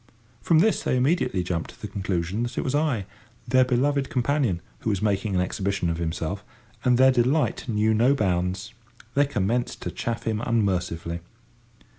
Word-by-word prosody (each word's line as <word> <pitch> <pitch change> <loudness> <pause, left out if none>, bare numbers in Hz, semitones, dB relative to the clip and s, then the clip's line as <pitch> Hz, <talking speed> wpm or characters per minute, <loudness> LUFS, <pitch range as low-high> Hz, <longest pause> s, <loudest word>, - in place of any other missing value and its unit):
From 165 - +3
this 210 +7 +3
they 130 - +1
immediately 130 - +1
jumped 85 -2 -3
to - - -15
the - - -5
conclusion 95 +1 -2
that 120 0 -3
it - - 0
was 130 - -2
I, 145 -9 +1 0.4
their 130 +2 +5
beloved 135 +2 +1
companion, 125 - +1 0.2
who - - -2
was 100 -3 0
making 100 -1 0
an 90 - +3
exhibition 95 -1 -1
of 85 - -3
himself, 85 +4 -3 0.4
and 125 -2 +4
their 130 +1 +6
delight 130 +2 +1
knew 110 0 +2
no 120 +6 +4
bounds. 95 +1 -1 0.4
They 145 0 +3
commenced 120 0 -1
to - - -3
chaff 115 0 -3
him 110 -1 -1
unmercifully. 90 -7 -1
110 Hz, 170 wpm, -25 LUFS, 95-130 Hz, 0.4 s, their